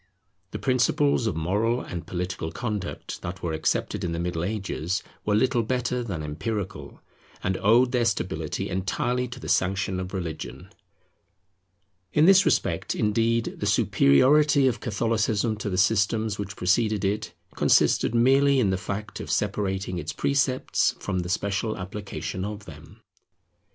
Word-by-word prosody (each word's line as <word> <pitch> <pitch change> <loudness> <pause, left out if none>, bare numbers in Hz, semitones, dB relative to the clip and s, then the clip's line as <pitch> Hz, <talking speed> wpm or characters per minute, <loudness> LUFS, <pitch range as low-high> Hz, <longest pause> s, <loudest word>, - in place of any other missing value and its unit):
The - - -5
principles 130 0 +2
of 100 - -1
moral 105 +9 0
and 85 -8 -7
political 90 -2 -4
conduct 105 -6 -5
that 90 +1 -6
were 85 -2 -1
accepted 80 +4 -1
in 85 -2 -2
the 85 - -3
Middle 85 -1 -2
Ages 95 -2 -2 0.2
were 105 - +2
little 125 +2 +2
better 125 +1 -1
than 90 -9 -4
empirical, 95 +7 -5 0.4
and 95 +1 0
owed 120 +4 +4
their 125 -2 +1
stability 110 -3 -2
entirely 120 +7 -1
to 125 +1 -9
the - - -8
sanction 95 0 +1
of 90 0 -5
religion. 85 -5 -6 1.4
In 150 - +5
this 195 +1 +6
respect, - - 0
indeed, 115 +2 0
the - - -1
superiority 140 - +4
of 130 - +1
Catholicism 110 -1 0
to 105 - -4
the 90 - -2
systems 105 +2 +2
which 100 0 -5
preceded 105 +2 +1
it, 105 -2 -2 0.2
consisted 120 - +3
merely 135 +3 +4
in 105 -6 +2
the 95 - 0
fact 105 +1 -5
of - - -7
separating 95 -3 -1
its 80 -1 -5
precepts 135 -2 +1
from 95 - -2
the 90 0 -4
special 100 +4 -1
application 100 -1 -5
of 105 0 -6
them. 75 -2 -13
105 Hz, 145 wpm, -25 LUFS, 95-120 Hz, 1.4 s, this